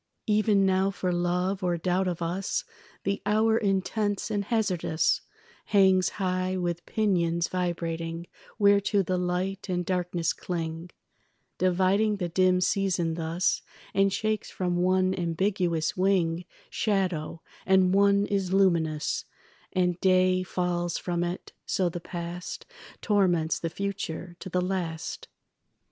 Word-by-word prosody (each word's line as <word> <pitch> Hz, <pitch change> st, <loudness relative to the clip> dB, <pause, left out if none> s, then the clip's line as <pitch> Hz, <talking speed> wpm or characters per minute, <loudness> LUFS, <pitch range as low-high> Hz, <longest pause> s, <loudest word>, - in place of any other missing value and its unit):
Even 210 Hz, -2 st, +3 dB
now 190 Hz, 0 st, +2 dB
for 190 Hz, -2 st, -2 dB
love 180 Hz, +2 st, 0 dB
or 175 Hz, -1 st, +1 dB
doubt 185 Hz, +2 st, 0 dB
of 175 Hz, -1 st, -2 dB
us 180 Hz, +4 st, -2 dB, 0.4 s
The 200 Hz, 0 st, -1 dB
hour 220 Hz, +2 st, +3 dB
intense 205 Hz, 0 st, 0 dB
and 205 Hz, -1 st, -1 dB
hazardous 190 Hz, -8 st, +1 dB, 0.4 s
Hangs 190 Hz, -2 st, +4 dB
high 185 Hz, -1 st, -1 dB
with 175 Hz, -1 st, -2 dB
pinions 170 Hz, -5 st, +1 dB
vibrating 170 Hz, -2 st, -3 dB, 0.3 s
Whereto 200 Hz, 0 st, +4 dB
the 185 Hz, 0 st, -1 dB
light 185 Hz, +2 st, -2 dB
and 180 Hz, -1 st, -1 dB
darkness 175 Hz, -2 st, 0 dB
cling, 165 Hz, -1 st, -4 dB, 0.7 s
Dividing 190 Hz, +4 st, +2 dB
the 175 Hz, -3 st, -2 dB
dim 185 Hz, +1 st, +3 dB
season 180 Hz, -3 st, +1 dB
thus, 165 Hz, +2 st, 0 dB, 0.3 s
And 195 Hz, 0 st, +3 dB
shakes 215 Hz, +1 st, -1 dB
from 180 Hz, -1 st, -1 dB
one 185 Hz, +1 st, +2 dB
ambiguous 175 Hz, -2 st, 0 dB
wing 180 Hz, -3 st, +1 dB, 0.3 s
Shadow, 180 Hz, -6 st, -1 dB, 0.2 s
and 190 Hz, -1 st, +4 dB
one 200 Hz, 0 st, +4 dB
is 195 Hz, -3 st, -1 dB
luminous, 170 Hz, -6 st, +1 dB, 0.5 s
And 180 Hz, -1 st, +1 dB
day 185 Hz, -1 st, +4 dB
falls 175 Hz, -1 st, -1 dB
from 175 Hz, -1 st, -2 dB
it; 175 Hz, +1 st, -5 dB
so 185 Hz, -3 st, +1 dB
the 175 Hz, -, -5 dB
past 175 Hz, 0 st, -6 dB, 0.4 s
Torments 175 Hz, -7 st, +2 dB
the 165 Hz, -, -2 dB
future 180 Hz, -2 st, -4 dB
to -, -, -7 dB
the 180 Hz, 0 st, 0 dB
last. 175 Hz, -4 st, -3 dB
185 Hz, 125 wpm, -27 LUFS, 175-195 Hz, 0.7 s, Hangs